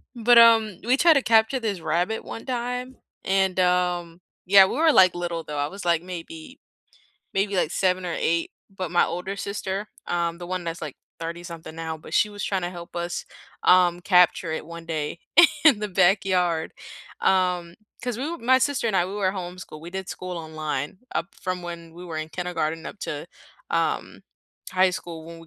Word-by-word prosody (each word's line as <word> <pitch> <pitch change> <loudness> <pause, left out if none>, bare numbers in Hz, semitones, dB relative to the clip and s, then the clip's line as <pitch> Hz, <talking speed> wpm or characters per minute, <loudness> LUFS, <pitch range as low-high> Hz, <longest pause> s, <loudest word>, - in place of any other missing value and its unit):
But, 235 +1 +5
um, 225 -4 +6
we 255 +3 +3
tried 335 +1 +6
to 275 - +2
capture 225 +3 +3
this 210 -6 -2
rabbit 175 +8 -1
one 225 - -8
time, 250 0 -3 0.3
and, 190 -1 +1
um, 180 -1 +1 0.2
yeah, 195 +1 +8
we - - -3
were, 320 +3 +4
like, 185 -5 +6
little, 170 -1 -3
though, 150 -1 -6
I 145 0 0
was, 195 +2 -9
like, 170 -1 +2
maybe 255 - -9 0.8
maybe, 200 +1 0
like, 170 -4 +1
7 185 -1 +1
or 170 - -2
8, 170 0 0 0.2
but 185 -3 -4
my 175 - +5
older 180 +4 -4
sister, 200 0 -4 0.2
um, 170 -1 -1
the 175 - -7
one 185 0 -3
that's, 165 0 -4
like, 150 -3 -6 0.2
thirty-something 165 -1 -7
now, 160 -1 -4
but - - -9
she 210 - +4
was 205 0 -7
tryna 185 -3 -1
help 175 -1 -10
us, 175 0 -3 0.4
um, 180 -1 +5
capture 180 -2 +3
it 160 - -4
one 170 0 -9
day 155 -1 -3 0.5
in 265 -9 +6
the 210 - -2
backyard. 180 -3 +2 0.5
Um, 180 -2 +1 0.3
'cause 245 -2 -2
we 255 - -3
w 335 0 -5
my 260 +2 +6
sister 270 -2 0
and 215 -4 +1
I, 175 - +3
we 190 - -7
were 195 -2 0
homeschooled, 180 -4 -7
we 170 - -8
did 190 0 -5
school 180 -1 -5
online 155 -1 -4 0.2
up 175 - -3
from 185 -1 -4
when 170 -1 -8
we 175 +1 -10
were 165 -2 -6
in 155 - -4
kindergarten 165 -2 -3
up - - -8
to, 145 +2 -5 0.4
um, - - -1 0.5
high 185 0 +4
school 170 -3 -7
when 165 0 -10
we 165 - -14
180 Hz, 190 wpm, -24 LUFS, 170-200 Hz, 0.8 s, yeah